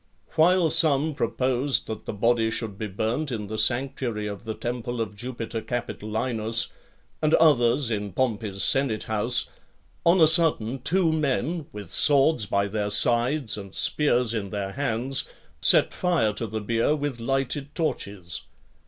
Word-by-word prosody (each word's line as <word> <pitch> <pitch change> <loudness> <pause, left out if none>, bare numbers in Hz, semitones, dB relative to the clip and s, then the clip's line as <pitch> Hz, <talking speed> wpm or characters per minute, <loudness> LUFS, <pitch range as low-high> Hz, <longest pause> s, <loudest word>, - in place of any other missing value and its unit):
While 170 0 +3
some 155 -1 +2
proposed 130 0 0
that 110 -1 -7
the - - -2
body 115 +2 +1
should 110 -2 -3
be 110 +2 -5
burnt 110 +9 -2
in 110 -3 -4
the 110 +2 -5
sanctuary 120 -2 0
of 105 +2 -7
the 110 -1 -4
temple 120 0 -4
of 105 -2 -4
Jupiter 115 0 -5
Capitolinus, 115 -1 -2 0.5
and 155 0 +3
others 130 -5 +3
in 105 -2 -3
Pompey's 105 -3 -2
senate 135 -6 +1
house; 115 +3 0 0.6
on 170 +2 +4
a 160 - +7
sudden, 150 -7 +4
two 170 +1 +1
men, 155 +2 -1
with 105 -4 -9
swords 140 -5 +3
by 100 0 0
their 105 0 -2
sides, 120 +2 +2
and 100 -1 -10
spears 125 -6 +2
in 105 -4 -3
their 100 -1 -4
hands, 130 +1 -1 0.4
set - - +5
fire 170 -13 +1
to 115 +2 -3
the 110 +1 -5
bier 115 +7 +1
with 145 -4 -4
lighted 135 +3 -3
torches. 100 - -4
120 Hz, 150 wpm, -25 LUFS, 110-140 Hz, 0.6 s, a